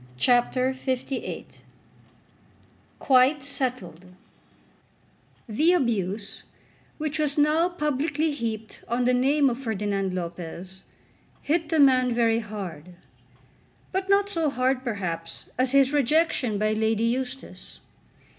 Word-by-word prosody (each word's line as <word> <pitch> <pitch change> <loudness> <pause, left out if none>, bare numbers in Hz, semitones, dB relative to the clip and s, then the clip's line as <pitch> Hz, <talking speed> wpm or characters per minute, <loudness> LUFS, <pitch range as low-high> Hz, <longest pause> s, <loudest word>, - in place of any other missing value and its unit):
CHAPTER 250 - +2
LVIII 260 0 -4 1.5
"Quite 265 +2 +4
Settled" 250 - -4 1.4
The 305 +11 +3
abuse 210 - -1 0.6
which 305 0 -3
was 295 -1 0
now 305 +4 +3
publicly 300 -1 -1
heaped 225 -5 -5
on 240 +1 0
the 250 - +3
name 275 +3 +3
of 245 -1 -1
Ferdinand 205 -5 -2
Lopez 180 +1 -6 0.6
hit 315 +1 0
the 320 -1 +1
man 255 -3 +5
very 230 -1 +2
hard; 180 -6 -7 1.0
but 380 +1 -2
not 400 0 +4
so 330 -6 0
hard 260 -1 0
perhaps 170 -8 -4
as 255 0 +2
his 275 0 +4
rejection 285 -5 +2
by 215 +1 +1
Lady 220 0 +1
Eustace. 255 +2 -4
255 Hz, 110 wpm, -25 LUFS, 215-290 Hz, 1.5 s, man